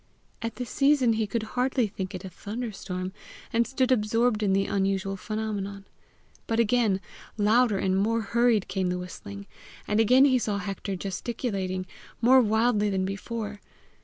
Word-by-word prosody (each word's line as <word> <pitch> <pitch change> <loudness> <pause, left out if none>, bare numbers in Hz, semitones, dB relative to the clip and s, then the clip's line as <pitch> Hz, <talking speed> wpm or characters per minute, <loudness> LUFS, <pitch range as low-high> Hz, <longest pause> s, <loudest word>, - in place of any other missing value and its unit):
At 230 -1 -3
the 250 - -4
season 275 -2 +3
he 220 -1 0
could 220 +2 -2
hardly 250 +2 0
think 190 -2 -5
it 185 +1 -7
a - - -6
thunderstorm, 195 -3 -5 0.4
and 235 +1 +2
stood 260 0 +1
absorbed 225 -1 +2
in 205 -2 +2
the 195 +1 +2
unusual 195 0 0
phenomenon. 200 -1 -4 0.6
But 225 0 0
again, 225 -4 +3 0.4
louder 215 +1 +3
and 190 0 +1
more 225 +4 +1
hurried, 235 -1 +2
came 190 -2 -1
the 180 - -1
whistling, 100 - -8 0.4
and 210 +1 +1
again 255 +5 +6
he 260 -3 +4
saw 210 -3 -1
Hector 200 -1 -4
gesticulating, 190 -1 -3 0.3
more 255 +3 +6
wildly 220 -1 +2
than 190 -1 0
before. 205 +2 -5
210 Hz, 155 wpm, -27 LUFS, 195-235 Hz, 0.6 s, again